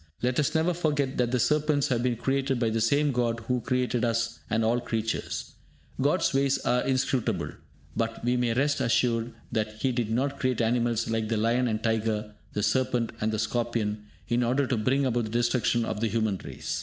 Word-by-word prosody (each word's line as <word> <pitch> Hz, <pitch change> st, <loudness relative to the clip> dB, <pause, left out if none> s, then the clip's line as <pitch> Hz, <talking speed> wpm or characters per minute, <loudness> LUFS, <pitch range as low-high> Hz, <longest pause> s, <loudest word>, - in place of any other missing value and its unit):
Let 125 Hz, +2 st, +1 dB
us 150 Hz, -, +1 dB
never 160 Hz, +3 st, +2 dB
forget 145 Hz, -5 st, 0 dB
that 125 Hz, -1 st, +2 dB
the 125 Hz, 0 st, +1 dB
serpents 150 Hz, 0 st, +2 dB
have 120 Hz, -2 st, +1 dB
been 125 Hz, -1 st, +1 dB
created 135 Hz, +2 st, 0 dB
by 115 Hz, -2 st, +1 dB
the 115 Hz, 0 st, 0 dB
same 140 Hz, +6 st, +3 dB
God 120 Hz, -2 st, 0 dB
who 125 Hz, +2 st, -1 dB
created 125 Hz, -1 st, 0 dB
us 115 Hz, -1 st, 0 dB
and 110 Hz, +1 st, +1 dB
all 110 Hz, -, +3 dB
other -, -, -2 dB
creatures. 115 Hz, -1 st, -3 dB, 0.5 s
God's -, -, +2 dB
ways 135 Hz, 0 st, +2 dB
are 125 Hz, +1 st, +3 dB
inscrutable, 130 Hz, -2 st, 0 dB, 0.4 s
but 115 Hz, 0 st, -2 dB
we 125 Hz, +1 st, +2 dB
may 120 Hz, -2 st, +1 dB
rest 145 Hz, +3 st, +1 dB
assured 115 Hz, 0 st, +1 dB, 0.2 s
that 110 Hz, -1 st, -1 dB
He 130 Hz, -, +3 dB
did 120 Hz, -3 st, -1 dB
not 135 Hz, +5 st, -1 dB
create 130 Hz, -3 st, 0 dB
animals 115 Hz, 0 st, +1 dB
like 110 Hz, -1 st, -1 dB
the 115 Hz, -, +1 dB
lion 120 Hz, +3 st, +2 dB
and 110 Hz, -2 st, 0 dB
the 110 Hz, -, -14 dB
tiger, 110 Hz, -2 st, 0 dB, 0.2 s
the 105 Hz, -, -1 dB
serpent 120 Hz, +1 st, +1 dB
and 110 Hz, +1 st, +1 dB
the 110 Hz, -, -1 dB
scorpion, 110 Hz, -1 st, -1 dB, 0.2 s
in 120 Hz, +1 st, +1 dB
order 130 Hz, +4 st, +2 dB
to 130 Hz, -, 0 dB
bring 130 Hz, +5 st, +1 dB
about 120 Hz, -2 st, +1 dB
the -, -, -5 dB
destruction 120 Hz, 0 st, +1 dB
of 105 Hz, -, -3 dB
the 115 Hz, -, +1 dB
human 110 Hz, -3 st, 0 dB
race. -, -, -4 dB
120 Hz, 205 wpm, -27 LUFS, 115-130 Hz, 0.5 s, same